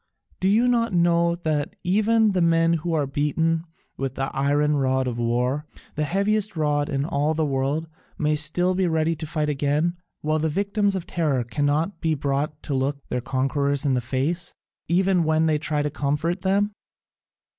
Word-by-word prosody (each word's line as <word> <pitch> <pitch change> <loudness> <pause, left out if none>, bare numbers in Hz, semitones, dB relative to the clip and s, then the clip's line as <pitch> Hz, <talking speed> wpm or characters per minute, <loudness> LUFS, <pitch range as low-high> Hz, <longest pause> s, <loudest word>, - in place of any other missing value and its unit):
Do 190 - +1
you 220 +5 +4
not 230 -3 +1
know 170 0 +3
that 155 -4 -2
even 215 +3 +3
the 185 -2 0
men 165 0 +3
who 175 +1 -2
are 150 -2 +1
beaten 160 +4 0 0.3
with 135 -1 -3
the 135 0 -3
iron 145 +2 +2
rod 130 -1 +1
of 120 -2 -3
war, 125 +5 0 0.3
the 150 - -1
heaviest 200 +4 +1
rod 145 -1 +1
in 135 +1 -1
all 150 -1 0
the 160 0 +1
world, 140 +3 -1 0.3
may 150 0 +1
still 165 +5 +1
be 185 0 +1
ready 160 0 +1
to 155 0 -6
fight 150 0 -1
again, 150 +4 0 0.3
while 155 +1 0
the 160 +1 0
victims 200 +4 0
of 180 -3 -3
terror 150 -7 0
cannot 145 - -1
be 160 -2 +1
brought 145 +1 -2
to 145 - -3
look 135 +1 -2
their 125 - -1
conquerors 135 +2 0
in 140 - +2
the 125 - +1
face, 140 +8 -2 0.3
even 180 0 +2
when 160 0 +2
they 155 -2 +2
try 150 -1 0
to 150 - -2
comfort 155 +5 -1
them?" 200 +2 +1
155 Hz, 180 wpm, -24 LUFS, 140-175 Hz, 0.3 s, you